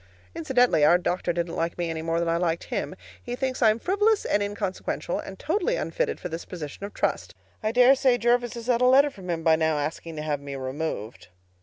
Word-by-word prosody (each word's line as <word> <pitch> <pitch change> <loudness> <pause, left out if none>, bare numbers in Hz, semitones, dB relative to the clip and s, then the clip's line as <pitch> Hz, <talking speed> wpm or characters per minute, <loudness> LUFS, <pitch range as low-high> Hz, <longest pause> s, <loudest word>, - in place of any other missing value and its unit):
Incidentally, 245 - +2
our 170 +4 +6
doctor 180 0 -1
didn't 170 0 -3
like 165 +1 -2
me 175 -1 -1
any 165 -1 -3
more 165 +1 -1
than 170 - -1
I 165 - +1
liked 170 -1 -1
him. - - -4 0.3
He 245 -1 -5
thinks 260 0 -3
I'm 220 -2 +5
frivolous 410 - +1
and 205 - +1
inconsequential, 205 -3 -3
and 190 - -8
totally 415 - 0
unfitted - - -2
for - - -5
this 165 0 -6
position 160 0 -8
of 205 - -16
trust. - - -2 0.3
I 215 -1 0
dare 250 +2 +6
say 260 -2 +3
Jervis 240 +1 +1
has 235 -1 -7
had 245 -1 +1
a - - +5
letter 275 +3 +5
from 185 -6 -11
him 165 -1 -2
by 160 -1 +5
now 160 -1 +1
asking 155 +2 -4
to 150 - -5
have 150 -2 -2
me 140 -1 -7
removed. 130 -4 -5
180 Hz, 220 wpm, -26 LUFS, 165-245 Hz, 0.3 s, our